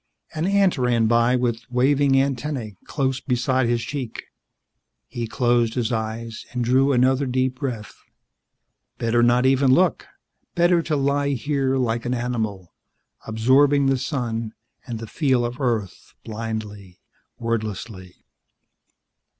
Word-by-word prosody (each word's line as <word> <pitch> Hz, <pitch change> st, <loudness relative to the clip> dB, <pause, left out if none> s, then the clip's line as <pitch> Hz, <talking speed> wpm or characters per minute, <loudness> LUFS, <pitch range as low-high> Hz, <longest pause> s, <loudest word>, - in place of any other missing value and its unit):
An 155 Hz, +3 st, -1 dB
ant 195 Hz, -5 st, +2 dB
ran 120 Hz, -2 st, +2 dB
by 120 Hz, +2 st, +3 dB
with 120 Hz, -2 st, -1 dB
waving 135 Hz, +2 st, +3 dB
antennae 135 Hz, -5 st, -2 dB
close 135 Hz, -2 st, -1 dB
beside 125 Hz, 0 st, 0 dB
his 120 Hz, -1 st, 0 dB
cheek. 130 Hz, -2 st, -5 dB, 0.8 s
He 120 Hz, -1 st, -5 dB
closed 120 Hz, -1 st, +1 dB
his 120 Hz, -2 st, -1 dB
eyes 110 Hz, 0 st, -4 dB
and 125 Hz, -1 st, -2 dB
drew 130 Hz, +3 st, +3 dB
another 130 Hz, +2 st, +2 dB
deep 130 Hz, 0 st, -1 dB
breath. 120 Hz, -7 st, -4 dB, 1.0 s
Better 115 Hz, +1 st, +1 dB
not 120 Hz, +1 st, +3 dB
even 135 Hz, 0 st, +4 dB
look; 175 Hz, +4 st, +2 dB, 0.5 s
better 175 Hz, 0 st, +3 dB
to 155 Hz, -1 st, -1 dB
lie 140 Hz, 0 st, +1 dB
here 135 Hz, +1 st, 0 dB
like 120 Hz, -2 st, -1 dB
an 125 Hz, -, 0 dB
animal, 110 Hz, -7 st, -3 dB, 0.5 s
absorbing 135 Hz, +6 st, +3 dB
the 135 Hz, 0 st, +2 dB
sun 115 Hz, -5 st, -3 dB, 0.3 s
and 120 Hz, -2 st, -4 dB
the 115 Hz, -, -7 dB
feel 130 Hz, -2 st, +1 dB
of 120 Hz, +4 st, -5 dB
Earth 110 Hz, -7 st, -3 dB
blindly, 105 Hz, -4 st, -6 dB, 0.4 s
wordlessly. 110 Hz, -5 st, -5 dB
125 Hz, 125 wpm, -23 LUFS, 115-135 Hz, 1.0 s, even